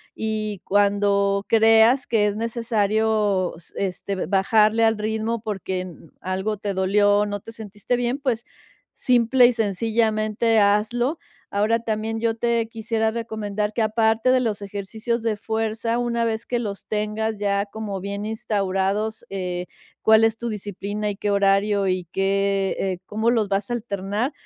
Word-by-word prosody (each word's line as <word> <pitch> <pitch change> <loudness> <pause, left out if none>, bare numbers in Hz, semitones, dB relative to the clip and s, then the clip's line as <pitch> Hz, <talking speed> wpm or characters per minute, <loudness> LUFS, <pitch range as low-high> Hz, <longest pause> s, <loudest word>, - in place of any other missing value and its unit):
y 215 -2 -3
cuando 200 0 +2
creas 225 +3 +5
que 220 -3 +2
es 205 -1 0
necesario 220 -3 0
s 165 - -14
este, 195 0 -3
bajarle 215 +3 +3
al 225 -1 +3
ritmo 220 +1 -2
porque 190 -4 -3
n 180 -2 -8 0.3
algo 190 +3 -2
te 200 0 -3
dolió, 205 +2 +3
no 205 0 -3
te 225 - -11
sentiste 220 +1 -4
bien, 245 +2 -1
pues, 245 -5 -1 0.5
simple 245 0 +4
y 240 - +6
sencillamente 220 +1 +1
hazlo. 220 +8 +1 0.3
Ahora, 215 +3 +2
también 225 0 -3
yo 230 -1 +1
te 235 -1 +1
quisiera 225 0 -1
recomendar 215 -2 -3
que 230 - -1
aparte 220 +2 +2
de 255 - +4
los 220 -5 -2
ejercicios 210 +4 -3
de 225 -1 0
fuerza, 225 +1 -2
una 240 -1 0
vez 225 0 -2
que 245 - -1
los 205 -4 -5
tengas 215 +1 -2
ya 200 0 0
como 205 -1 -5
bien 200 +2 -5
instaurados, 210 0 -1
eh, 180 -2 -3 0.4
cuál 220 0 +5
es 225 0 +2
tu 235 - -5
disciplina 210 0 -4
y 200 - -4
qué 205 - -2
horario 200 0 +2
y 185 -1 -1
qué, 195 0 +1
eh 190 -2 -1
cómo 220 +4 0
los 220 -4 +1
vas 195 +1 -1
a - - -1
alternar, 210 +2 -2
215 Hz, 155 wpm, -23 LUFS, 200-225 Hz, 0.5 s, y